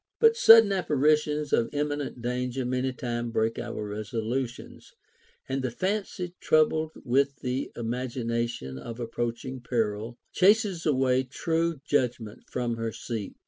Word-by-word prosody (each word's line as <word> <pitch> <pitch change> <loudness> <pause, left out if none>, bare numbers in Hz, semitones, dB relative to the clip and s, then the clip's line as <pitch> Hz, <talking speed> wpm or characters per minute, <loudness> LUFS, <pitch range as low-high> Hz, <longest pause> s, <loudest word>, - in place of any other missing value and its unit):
t - - -61
But 455 0 +6
sudden 225 - +8
apparitions 150 -4 +1
of 115 - +3
imminent 145 -4 -2
danger 125 +1 -2
many 130 +1 0
times 120 -2 -3
break 110 0 0
our 115 -3 -4
resolutions; 115 +4 -4 0.5
and 135 +1 -1
the 130 - -1
fancy 185 - -3
troubled 155 0 +2
with 140 +2 +1
the 130 +2 -2
imagination 115 - -3
of 115 - -8
approaching 120 +2 -4
peril 115 -1 -2
chases 195 -3 +3
away 130 -3 +3
true 160 +4 -1
judg 130 -5 +1
ment 110 -2 -11
from 120 -2 -2
her 115 0 -2
seat. 110 -2 -5
125 Hz, 135 wpm, -27 LUFS, 115-150 Hz, 0.5 s, sudden